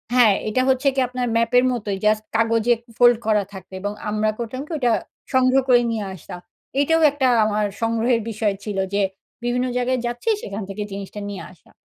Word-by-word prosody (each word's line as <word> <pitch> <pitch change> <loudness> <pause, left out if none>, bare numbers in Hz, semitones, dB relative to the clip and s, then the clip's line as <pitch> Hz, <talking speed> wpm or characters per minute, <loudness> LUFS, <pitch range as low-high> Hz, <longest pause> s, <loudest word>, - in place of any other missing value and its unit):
হ্যাঁ 230 -5 +6 0.2
এটা 255 +4 +1
হচ্ছে 265 +2 +2
কি - - +1
আপনার 250 0 -3
ম্যাপের 235 +2 +3
মতোই 205 -5 -3
জাস্ট 215 0 +3
কাগজে 230 +1 +3 0.2
ফোল্ড 240 -1 +6
করা 210 -2 +3
থাকে। 190 -1 -11
এবং 205 - -2 0.2
আমরা 215 +1 +1
করতাম 240 +3 -4
কি? 320 - -13
ওইটা 245 -4 +2 0.4
সংগ্রহ 260 +1 +4
করে 245 -1 +6
নিয়ে 215 -3 -2
আসতাম। 180 0 -9 0.4
এইটাও 325 +3 +3
একটা 280 -2 +1 0.2
আমার 210 0 0 0.2
সংগ্রহের 230 +1 +1
বিষয় 215 -2 0
ছিল 205 -2 -4 0.2
যে, 205 - +2 0.4
বিভিন্ন 245 +1 0
জায়গায় 250 0 0
যাচ্ছি 240 - -2
সেখান 200 +1 -5
থেকে 205 +2 -4
জিনিসটা 200 +1 -7
নিয়ে 200 - -6
আসা। 175 - -24
230 Hz, 180 wpm, -22 LUFS, 210-250 Hz, 0.4 s, হ্যাঁ